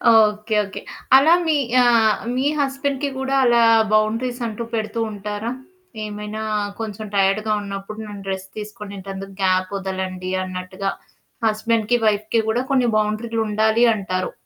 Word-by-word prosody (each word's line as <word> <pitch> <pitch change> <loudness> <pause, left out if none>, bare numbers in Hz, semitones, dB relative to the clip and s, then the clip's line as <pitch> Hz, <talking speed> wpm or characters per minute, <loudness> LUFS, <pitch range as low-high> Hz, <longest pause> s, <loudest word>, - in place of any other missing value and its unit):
Okay 215 0 +3
okay. 200 -1 -7 0.4
అలా 315 +5 +6
మీ 310 - +3 0.3
ఆహ్, 225 -3 +4 0.2
మీ 260 +2 0
హస్బెండ్‌కి 280 0 -1
కూడా 265 0 -1
అలా 235 -1 +5 0.3
బౌండరీస్ 230 +4 +1
అంటూ 225 +1 -5
పెడుతూ 220 0 -2
ఉంటారా? 210 +2 -4 0.5
ఏమైనా 210 +1 -6 0.4
కొంచెం 215 -1 -5
టైర్డ్‌గా 200 +2 +2
ఉన్నప్పుడు 200 +2 -6
నన్ను 200 -1 -9
రెస్ట్ 190 0 -5
తీసుకొనింటందుకు 200 -2 -8
గ్యాప్ 185 0 +2
ఒదలండి 185 -1 -4
అన్నట్టుగా. 185 +1 -4 0.6
హస్బెండ్‌కి, 220 +1 +1
వైఫ్‌కి 215 +2 +2
కూడా 240 +3 +1
కొన్ని 250 -3 +3
బౌండరీలు 215 +2 -1
ఉండాలి 220 +3 +3
అంటారు. 185 -2 -2
215 Hz, 125 wpm, -21 LUFS, 195-230 Hz, 0.6 s, అలా